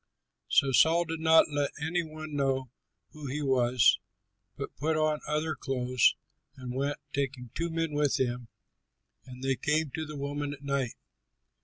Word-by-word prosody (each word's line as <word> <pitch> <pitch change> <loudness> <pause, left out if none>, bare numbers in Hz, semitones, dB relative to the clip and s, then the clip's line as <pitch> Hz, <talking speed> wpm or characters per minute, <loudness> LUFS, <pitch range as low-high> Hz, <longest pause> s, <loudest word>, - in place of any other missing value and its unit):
So 135 - +3
Saul 165 +6 +5
did 165 0 -4
not 160 -1 +5
let 145 -1 0
any 160 +4 0
one 155 -2 -7
know 135 -3 0 0.4
who 150 -2 -8
he 145 +3 -3
was, 125 -2 +4 0.6
but - - -6
put 155 +2 0
on 155 -1 +1
other 155 +1 0
clothes 125 -3 +2 0.4
and 125 -1 -6
went, 140 +2 -1 0.2
taking 135 -4 -3
two 170 +4 -2
men 165 -1 -1
with 145 -1 +1
him. 125 -2 -1 0.8
And 130 0 -10
they 135 0 +1
came 150 +1 0
to 155 +2 -4
the 150 -1 -7
woman 145 +1 -3
at 140 0 -12
night. 140 -4 -1
145 Hz, 160 wpm, -29 LUFS, 130-155 Hz, 0.8 s, Saul